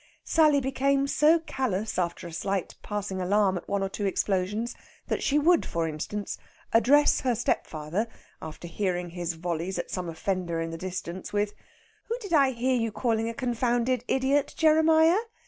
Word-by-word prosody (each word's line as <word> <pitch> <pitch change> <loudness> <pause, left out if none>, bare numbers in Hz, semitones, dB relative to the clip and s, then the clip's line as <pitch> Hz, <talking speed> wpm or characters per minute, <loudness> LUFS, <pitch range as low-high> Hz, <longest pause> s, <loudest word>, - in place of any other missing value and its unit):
Sally 305 -3 +4
became 275 +1 +1
so 300 +3 +4
callous 255 - -2
after 175 0 -2
a 170 - -8
slight 195 +2 -2
passing 205 -2 -4
alarm 195 +1 +2
at 175 - -6
one 200 -1 0
or 195 - -1
two 200 +1 -2
explosions 200 +5 -1 0.4
that - - -1
she 290 - +2
would, 330 +3 +4
for 165 -1 -2
instance, 180 +7 -4 0.3
address 280 +6 +5
her 250 -3 +1
stepfather, 175 -2 -1 0.3
after 160 +2 -8
hearing 180 -1 -2
his 175 -1 -3
volleys 170 +2 -3
at - - -4
some 180 -2 -3
offender 170 0 -2
in 165 0 -3
the - - -5
distance, 185 0 -5
with, 205 0 0 0.5
"Who 465 - -2
did 405 -8 -6
I 280 -4 +5
hear 255 +1 0
you 230 -3 0
calling 225 0 0
a 230 - -6
confounded 245 0 0
idiot, 270 +2 +1
Jeremiah?" 320 +3 +5
210 Hz, 165 wpm, -27 LUFS, 180-270 Hz, 0.5 s, address